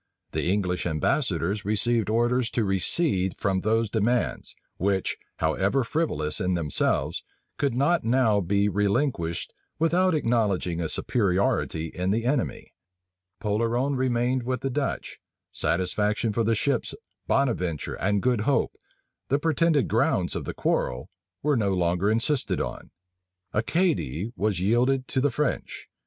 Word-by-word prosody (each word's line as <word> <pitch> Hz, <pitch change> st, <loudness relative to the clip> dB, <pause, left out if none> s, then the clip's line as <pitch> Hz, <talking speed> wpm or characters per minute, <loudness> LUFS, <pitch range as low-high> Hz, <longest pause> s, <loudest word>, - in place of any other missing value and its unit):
The -, -, -1 dB
English 90 Hz, -3 st, 0 dB
ambassadors 85 Hz, +4 st, 0 dB
received 110 Hz, +2 st, +1 dB
orders 120 Hz, +2 st, +2 dB
to 115 Hz, -, +3 dB
recede 95 Hz, -, +1 dB
from 95 Hz, -2 st, 0 dB
those 115 Hz, +2 st, +1 dB
demands, 115 Hz, +3 st, -1 dB, 0.2 s
which, 95 Hz, 0 st, 0 dB, 0.2 s
how 80 Hz, 0 st, +1 dB
ever 100 Hz, +8 st, +1 dB
frivolous 115 Hz, -, -1 dB
in 90 Hz, 0 st, +1 dB
themselves, 80 Hz, -5 st, 0 dB, 0.4 s
could 140 Hz, -4 st, +1 dB
not 145 Hz, +7 st, +2 dB
now 115 Hz, -3 st, +3 dB
be 100 Hz, +3 st, +1 dB
relinquished 100 Hz, -, 0 dB, 0.2 s
without 175 Hz, +2 st, +2 dB
acknowledging 105 Hz, -, 0 dB
a 80 Hz, -, -2 dB
superiority 95 Hz, -6 st, 0 dB
in 90 Hz, +2 st, -3 dB
the 115 Hz, +4 st, 0 dB
enemy. 130 Hz, 0 st, -1 dB, 0.7 s
Polerone 115 Hz, +6 st, 0 dB
remained 125 Hz, 0 st, +1 dB
with 125 Hz, 0 st, -2 dB
the 135 Hz, -, -2 dB
Dutch; 140 Hz, +2 st, -3 dB, 0.3 s
satisfaction 105 Hz, +6 st, 0 dB
for 115 Hz, -, +1 dB
the 115 Hz, +1 st, +2 dB
ships 130 Hz, +3 st, 0 dB, 0.3 s
Bonaventure 90 Hz, -, 0 dB
and 100 Hz, +1 st, 0 dB
Good 125 Hz, -4 st, +2 dB
Hope, 135 Hz, +6 st, +1 dB, 0.5 s
the 140 Hz, -, +3 dB
pretended 160 Hz, -1 st, +2 dB
grounds -, -, +1 dB
of -, -, -3 dB
the -, -, -4 dB
quarrel, 60 Hz, 0 st, -1 dB, 0.3 s
was 145 Hz, -4 st, +2 dB
no 100 Hz, -3 st, +1 dB
longer 90 Hz, +2 st, +1 dB
insisted 120 Hz, +6 st, +1 dB
on; -, -, -5 dB, 0.6 s
Acadie 115 Hz, -, 0 dB
was 105 Hz, -3 st, 0 dB
yielded 125 Hz, +7 st, +2 dB
to 130 Hz, -, 0 dB
the 145 Hz, -, +3 dB
French. 145 Hz, +2 st, -2 dB
110 Hz, 135 wpm, -26 LUFS, 95-130 Hz, 0.7 s, to